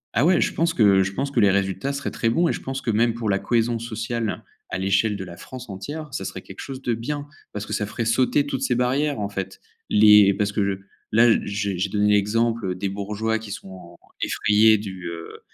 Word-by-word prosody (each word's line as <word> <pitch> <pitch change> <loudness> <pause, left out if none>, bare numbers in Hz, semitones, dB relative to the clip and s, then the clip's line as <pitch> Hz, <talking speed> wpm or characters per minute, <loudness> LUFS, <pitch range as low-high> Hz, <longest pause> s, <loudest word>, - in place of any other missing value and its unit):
Ah 120 +7 +3
ouais 180 +1 +4
je - - +1
pense 165 0 0
que 100 -4 +5
je 95 - -1
pense 140 +6 -2
que 125 - +1
les 100 -2 +5
résultats 95 +6 0
seraient 140 0 -4
très 115 - 0
bons 170 +9 +2
et - - +1
je - - -6
pense 135 0 -4
que 115 - -1
même 115 +2 +2
pour 110 -3 -1
la 100 - +1
cohésion 115 0 0
sociale 115 -1 -3 0.3
à 95 - -3
l'échelle 100 +2 +1
de 95 - -5
la 85 -2 -10
France 125 -3 -10
entière, 145 +11 -6
ça - - -3
serait - - -6
quelque - - -12
chose 135 -1 -7
de 120 - 0
bien, 145 +6 -4 0.2
parce 105 0 -5
que - - -6
ça 105 - 0
ferait 115 +2 -3
sauter 130 +5 +2
toutes 135 -2 -3
ces 125 -2 +1
barrières 130 +2 0
en 100 - -2
fait. 95 -1 -5 0.3
Les 105 -2 +7
parce 105 0 0
que 100 -2 -1 0.3
là, 115 +2 +5 0.2
j'ai 100 -2 -2
j'ai 95 +2 0
donné 105 +1 +2
l'exemple 105 -1 +1
des 95 +2 -3
bourgeois 105 +3 -2
qui 110 -2 -10
sont 95 -4 -9 0.2
effrayés 110 +1 +4
du, 95 -3 -7
heu, 85 0 -8
110 Hz, 230 wpm, -23 LUFS, 100-120 Hz, 0.3 s, Les